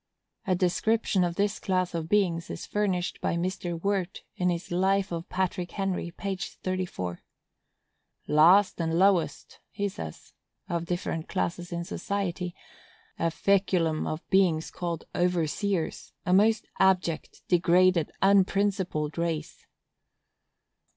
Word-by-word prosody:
A 185 - +3
description 190 +2 +1
of 175 -1 -1
this 205 +1 0
class 185 -2 0
of 165 -1 -3
beings 175 -5 +1
is - - -6
furnished 190 -4 -1
by - - 0
Mr. 175 -1 -2
Wirt, 195 -1 -2
in 180 0 +1
his 175 0 -3
Life 190 +2 +2
of 170 0 -5
Patrick 185 -1 -2
Henry, 195 -3 -2
page 190 +2 -4
34. 180 - -4 1.0
"Last 175 +5 +5
and 165 0 0
lowest," 190 -2 +1
he 205 - -2
says, 200 +1 -8 0.3
[of 170 -2 -2
different 165 -2 -3
classes 175 +1 -2
in 170 0 -2
society] 180 -1 -3 0.6
"a 165 - +2
feculum 180 -3 +1
of 155 +1 -5
beings 175 -5 +3
called 170 -2 -4
overseers,—a 180 +1 -1
most 215 +3 +4
abject, 185 -4 +1
degraded, 175 -1 +4
unprincipled 195 -5 +2
race." 165 -2 -3
180 Hz, 115 wpm, -28 LUFS, 170-195 Hz, 1.0 s, Last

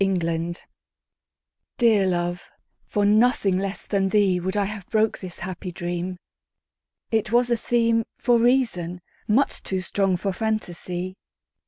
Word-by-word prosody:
The 195 -1 +2
Dream 170 0 -1 1.2
DEAR 220 -5 +4
love, 175 -1 -2 0.4
for 205 -1 +1
nothing 210 -3 +3
less 195 0 -4
than 195 -2 +1
theeWould 190 -2 +2
I 205 -1 +2
have 200 -2 -6
broke 220 0 +1
this 180 -3 -7
happy 180 0 -6
dream; 175 +1 -4 0.9
It 220 -1 0
was 240 +1 +3
a - - +5
themeFor 230 +1 +1
reason, 200 -9 +1 0.3
much 250 +7 +2
too 190 - -2
strong 190 -1 +1
for 195 +2 -2
fantasy. 185 -4 -3
195 Hz, 130 wpm, -24 LUFS, 180-220 Hz, 1.2 s, a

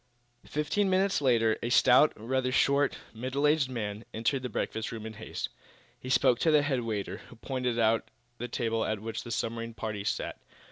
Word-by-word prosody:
Fifteen 170 +7 0
minutes 190 -3 +2
later 115 -5 +3
a 120 - -2
stout, 125 +4 +6
rather 125 +3 -1
short, 140 +2 +3 0.2
middle 130 +5 -2
aged 150 -3 +3
man 105 -3 -4
entered 115 +5 0
the 125 - -4
breakfast 110 0 -3
room 110 -1 -6
in 110 - -6
haste. 110 +1 -5 0.5
He 130 - -8
spoke 130 -1 +4
to 165 - +3
the 150 -2 +5
head 140 -3 0
waiter, 110 -4 -3
who - - -13
pointed 125 0 -2
out 115 -1 +2 0.3
the 120 - -3
table 115 -1 -1
at 110 -1 -1
which 110 +2 -4
the 120 - -9
submarine 115 0 -3
party 110 -3 -4
sat. - - -2
120 Hz, 185 wpm, -29 LUFS, 110-135 Hz, 0.5 s, stout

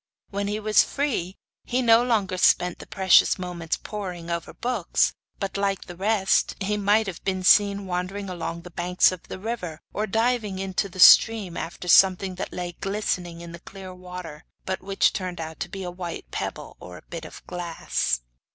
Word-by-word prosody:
When 200 0 -2
he 210 +1 -2
was 215 0 +4
free 220 -11 -2 0.3
he 255 +1 -1
no 230 0 +6
longer 210 -6 0
spent 180 -1 +3
the - - -10
precious 190 -2 +4
moments 175 -3 -3
poring 180 -5 -6
over 170 0 -3
books, 240 -8 0 0.3
but, 195 0 -3
like 200 -1 -1
the 175 - -9
rest, 195 +1 +1
he 205 +2 -1
might 210 +2 +2
have 190 -4 -7
been 185 -1 -2
seen 200 +1 +5
wandering 185 +2 -3
along 170 -2 -5
the 180 - -11
banks 180 +2 +3
of 185 -2 -7
the - - -6
river, 185 -6 -5
or 215 +1 -1
diving 225 -2 0
into 195 +1 -2
the 185 0 -11
stream 205 -2 +7
after 175 +1 -6
something 190 +1 +5
that 180 - -5
lay 180 -1 -4
glistening 185 -4 -2
in 170 0 -9
the 170 - -9
clear 190 +1 -10
water, 180 -3 -9 0.2
but 190 0 -3
which 195 +1 +1
turned 185 -3 -4
out 160 0 -6
to - - -4
be 195 -1 -6
a 180 - -4
white 175 -1 -7
pebble - - -5
or 90 0 -10
a - - -15
bit 165 -1 -8
of 155 - -11
glass. 170 - -2
185 Hz, 190 wpm, -25 LUFS, 175-205 Hz, 0.3 s, stream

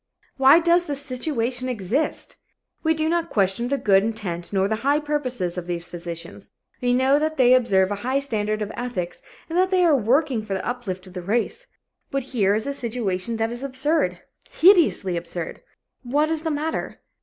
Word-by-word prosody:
Why 270 +3 +7
does 345 +1 +4
this 285 -1 -1
situation 255 -2 -2
exist? 240 - -1 0.4
We 320 0 +2
do 315 0 0
not 335 0 0
question 195 +3 +1
the 280 +2 0
good 195 -5 +4
intent 200 -6 -4
nor 195 -1 +2
the 220 +1 -1
high 280 +5 +2
purposes 255 - -2
of 175 - -9
these 175 -1 -3
physicians. 170 +2 -8 0.3
We 245 0 +1
know 260 +3 +3
that 310 +1 -1
they 250 -1 +6
observe 200 -6 +3
a 205 - -2
high 260 +3 0
standard 215 -6 -1
of 210 - -5
ethics 225 -8 -4 0.3
and 330 - -5
that 370 0 +3
they 370 -2 +3
are 320 -4 +5
working 255 0 +1
for 200 -2 -3
the 190 - -4
uplift 200 -7 -4
of 185 - -13
the 180 - -5
race. 215 +6 -2 0.4
But 275 -1 -2
here 200 -4 +3
is 220 - -2
a 280 - -2
situation 230 -4 -2
that 225 +1 -1
is 240 +1 -6
absurd 275 +4 0 0.3
hideously 325 - +4
absurd. 170 0 -6 0.4
What 290 +5 +1
is 320 -1 -1
the 320 - -2
matter? 310 +1 -3
245 Hz, 190 wpm, -23 LUFS, 195-290 Hz, 0.4 s, Why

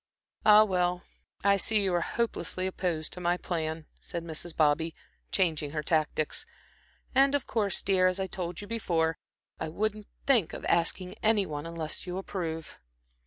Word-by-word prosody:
"Ah, 210 0 +9
well, 180 -3 0 0.4
I 200 0 +5
see 210 +2 +3
you 190 -2 +1
are 175 - +2
hopelessly 215 -3 -2
opposed 175 -4 -2
to 180 - -7
my 175 0 +2
plan," 160 -3 -3
said 170 - -5
Mrs. 165 0 -6
Bobby, 160 +2 +2 0.4
changing 155 -6 +1
her 150 -1 -2
tactics, 155 -1 0 0.7
"and 275 +2 +5
of 285 - -1
course, 210 -5 +1
dear, 185 -2 +4
as 185 +1 0
I 190 - 0
told 180 -1 -4
you 205 - -8
before, 170 -8 0 0.4
I 160 - -3
wouldn't 210 +4 -2 0.2
think 235 - +3
of - - -6
asking 180 +2 +1
any 215 -2 +4
one 150 -1 -5
unless 165 +1 -4
you 180 +1 -3
approve." 165 -5 -5
180 Hz, 165 wpm, -29 LUFS, 160-200 Hz, 0.7 s, Ah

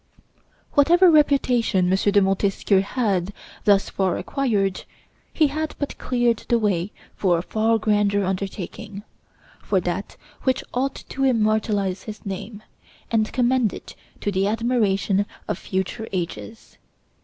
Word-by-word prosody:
Whatever 345 +5 +6
reputation 245 - +3
M. - - +5 0.2
de 205 0 +4
Montesquieu 195 0 +2
had 200 -4 -1 0.3
thus 200 -1 +4
far 190 -3 0
acquired, 205 -9 -1 0.5
he 315 - +3
had 310 +2 -3
but 285 - -4
cleared 240 -2 +1
the 235 - +4
way 200 -4 0 0.2
for 180 -4 +2
a 165 - -3
far 225 +3 +1
grander 205 -2 +1
undertaking 195 +2 -5 0.6
for - - +1
that - - -4 0.2
which 260 -1 0
ought 270 +2 -2
to 270 - -3
immortalize 215 -6 +1
his 215 -1 -9
name, 205 +2 -6 0.5
and 220 -1 +1
commend 250 -3 +2
it - - -10 0.3
to 205 - -1
the 195 0 +1
admiration 205 -3 +1 0.2
of - - -2
future 190 +4 -3
ages. 185 +5 -6
210 Hz, 130 wpm, -23 LUFS, 195-245 Hz, 0.6 s, Whatever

